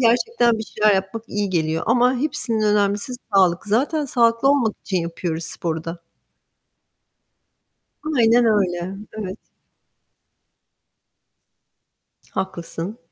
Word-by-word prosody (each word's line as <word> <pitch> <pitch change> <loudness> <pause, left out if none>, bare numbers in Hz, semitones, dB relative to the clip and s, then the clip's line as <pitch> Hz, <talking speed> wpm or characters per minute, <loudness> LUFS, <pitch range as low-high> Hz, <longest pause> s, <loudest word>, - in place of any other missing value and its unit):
gerçekten 240 - +3
bir 220 - -3
şeyler 210 -1 +2
yapmak 195 +4 -2
iyi 205 -1 -2
geliyor 160 -2 0
ama 245 +2 +4
hepsinden 230 -6 0
önemlisi 205 +4 0 0.2
sağlık. 180 -2 +3
Zaten 275 +9 +1
sağlıklı 235 0 +2
olmak 255 -7 +2
için 190 - -2
yapıyoruz 170 -1 -3
sporu 160 -1 -4
da. 170 +1 -6 2.2
Aynen 235 +1 +5
öyle. 190 -4 +1 0.2
Evet. 205 -2 -6 2.9
Haklısın. 180 +3 -5
210 Hz, 95 wpm, -21 LUFS, 180-235 Hz, 2.9 s, Aynen